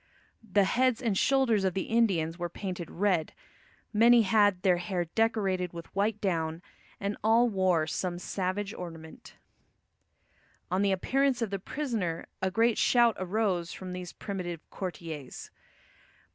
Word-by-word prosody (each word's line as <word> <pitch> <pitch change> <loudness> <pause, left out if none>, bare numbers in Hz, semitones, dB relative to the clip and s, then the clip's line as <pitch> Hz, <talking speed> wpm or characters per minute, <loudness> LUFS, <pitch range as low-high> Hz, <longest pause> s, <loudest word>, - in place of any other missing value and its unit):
The 205 -2 +2
heads 250 +4 +2
and 230 -5 0
shoulders 240 -3 +3
of 190 -2 0
the 190 - 0
Indians 185 -8 +1
were 175 0 -2
painted 180 -2 -5
red, 180 -4 0 0.6
many 230 +2 +6
had 205 -3 +3
their 180 -2 +4
hair 175 0 -2
decorated 190 -2 0
with 170 +1 -10
white 205 +2 +1
down, 165 -3 -1 0.4
and 200 +1 -3
all 230 +3 +5
wore 185 -6 +2
some 175 +2 -3
savage 195 +3 -3
ornament. 165 -3 -10 1.4
On 185 +1 +1
the 200 -1 +2
appearance 260 +6 +1
of 215 - -3
the 195 - -2
prisoner 210 - -3 0.2
a 190 - +1
great 225 +3 +2
shout 240 -2 +4
arose 185 -2 -1
from 185 -1 -7
these 180 -1 -6
primitive 180 -5 -6
courtiers. 165 -7 -7
190 Hz, 140 wpm, -29 LUFS, 175-220 Hz, 1.4 s, many